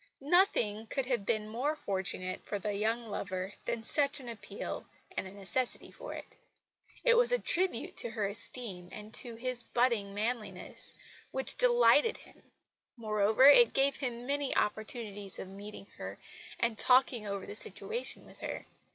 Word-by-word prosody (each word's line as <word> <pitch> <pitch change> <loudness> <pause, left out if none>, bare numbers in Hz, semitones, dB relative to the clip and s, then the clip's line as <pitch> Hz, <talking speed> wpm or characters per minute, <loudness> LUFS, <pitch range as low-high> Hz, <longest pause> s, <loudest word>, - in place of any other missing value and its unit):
Nothing 225 - +3
could 270 +3 -1
have 245 -6 -1
been 215 -2 0
more 255 +8 -1
fortunate 190 -6 -3
for 205 - -3
the 205 +1 -3
young 225 +4 0
lover 190 -1 -4
than 235 -1 -2
such 285 +4 +1
an 255 - -10
appeal 230 -2 -6 0.3
and - - -2
the - - -10
necessity 200 +6 -2
for - - -8
it. - - -8 0.7
It 475 -1 +6
was 485 0 +6
a - - +4
tribute 365 - 0
to 235 - +2
her 220 -2 -1
esteem, 200 -3 -4
and 215 +1 -9
to 235 -2 +2
his 250 +1 +2
budding 230 -5 +1
manliness, 220 +1 -3 0.3
which - - -1
delighted 485 -2 +5
him. - - -17 0.6
Moreover, 215 +2 +3
it 470 - +8
gave 275 0 +3
him 245 -3 -4
many 285 0 0
opportunities 210 -3 -2
of 190 - -7
meeting 200 +1 -9
her, - - -6 0.4
and 235 -2 0
talking 250 -4 +5
over 200 -1 -3
the - - -7
situation 450 - -4
with - - -16
her. - - -5
230 Hz, 160 wpm, -32 LUFS, 205-270 Hz, 0.7 s, it